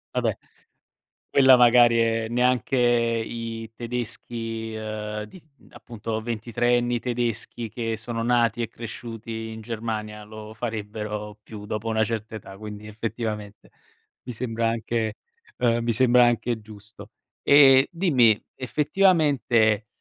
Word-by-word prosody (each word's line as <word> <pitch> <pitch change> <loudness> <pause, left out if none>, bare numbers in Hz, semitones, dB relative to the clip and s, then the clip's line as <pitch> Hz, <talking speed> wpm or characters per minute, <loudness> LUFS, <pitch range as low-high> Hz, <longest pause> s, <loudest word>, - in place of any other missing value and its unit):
Vabbè, - - 0 0.9
quella 130 -2 +7
magari 120 -1 +6
è 115 -1 +1
neanche 125 +2 +1
i 115 -2 0
tedeschi, 115 -1 -4
ehm, 105 -1 -5
di 140 +12 -13 0.3
appunto 110 -1 -6
ventitreenni 120 +2 0
tedeschi 120 -2 -3
che 115 -1 -3
sono 115 +1 -4
nati 120 -1 +2
e 115 - -1
cresciuti 115 -1 -7
in 110 0 -8
Germania 110 -2 -5
lo 110 0 -10
farebbero 105 -2 -5
più 105 -2 -10
dopo 105 +2 -4
una 110 0 +2
certa 110 0 -4
età, 95 -2 -9
quindi 105 0 -8
effettivamente 105 -1 -5 0.5
mi 125 - -6
sembra 115 -1 -1
anche 115 -1 -2 0.4
ehm, 120 -1 +1
mi 115 0 +1
sembra 125 +1 +5
anche 120 -1 0
giusto. 105 0 -13 0.3
Ehm, 135 -1 +7
dimmi 135 - +3 0.2
effettivamente, 140 - +2
115 Hz, 115 wpm, -24 LUFS, 110-120 Hz, 0.9 s, quella